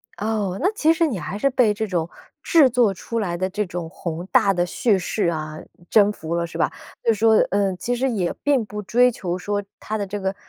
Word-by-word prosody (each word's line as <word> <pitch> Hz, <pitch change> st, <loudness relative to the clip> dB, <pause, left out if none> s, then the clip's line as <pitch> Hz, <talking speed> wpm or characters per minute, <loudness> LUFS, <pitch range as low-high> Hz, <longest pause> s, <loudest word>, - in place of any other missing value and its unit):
哦， 205 Hz, -3 st, -2 dB
那 380 Hz, +5 st, +2 dB
其 320 Hz, -5 st, +3 dB
实 330 Hz, 0 st, +2 dB
你 230 Hz, -, -2 dB
还 155 Hz, +7 st, -5 dB
是 275 Hz, +6 st, +2 dB
被 245 Hz, -5 st, +3 dB
这 220 Hz, +1 st, -2 dB
种 170 Hz, -3 st, -1 dB, 0.3 s
制 315 Hz, -5 st, +5 dB
作 235 Hz, -5 st, +3 dB
出 230 Hz, +5 st, -4 dB
来 175 Hz, -5 st, -2 dB
的 185 Hz, +1 st, -1 dB
这 210 Hz, +2 st, -2 dB
种 175 Hz, -1 st, -5 dB
宏 170 Hz, 0 st, -5 dB
大 200 Hz, -, +4 dB
的 175 Hz, -1 st, +1 dB
叙 205 Hz, +2 st, +1 dB
事 185 Hz, +1 st, -1 dB
啊， 155 Hz, -2 st, -3 dB, 0.3 s
征 210 Hz, -1 st, +5 dB
服 165 Hz, -4 st, -6 dB
了 170 Hz, 0 st, -1 dB
是 -, -, -8 dB
吧？ -, -, +1 dB, 0.3 s
就 230 Hz, -, +4 dB
是 210 Hz, -, -7 dB
说， 225 Hz, -1 st, +5 dB, 0.2 s
嗯， 195 Hz, -2 st, +1 dB
其 245 Hz, +5 st, -2 dB
实 265 Hz, +2 st, 0 dB
也 190 Hz, -7 st, -1 dB
并 275 Hz, -6 st, +2 dB
不 210 Hz, 0 st, -6 dB
追 245 Hz, +5 st, +3 dB
求 180 Hz, -5 st, -4 dB
说 205 Hz, +2 st, -2 dB, 0.2 s
它 215 Hz, -, -4 dB
的 200 Hz, -1 st, -3 dB
这 205 Hz, +1 st, -4 dB
个 190 Hz, 0 st, -2 dB
205 Hz, 250 characters per minute, -22 LUFS, 180-230 Hz, 0.3 s, 制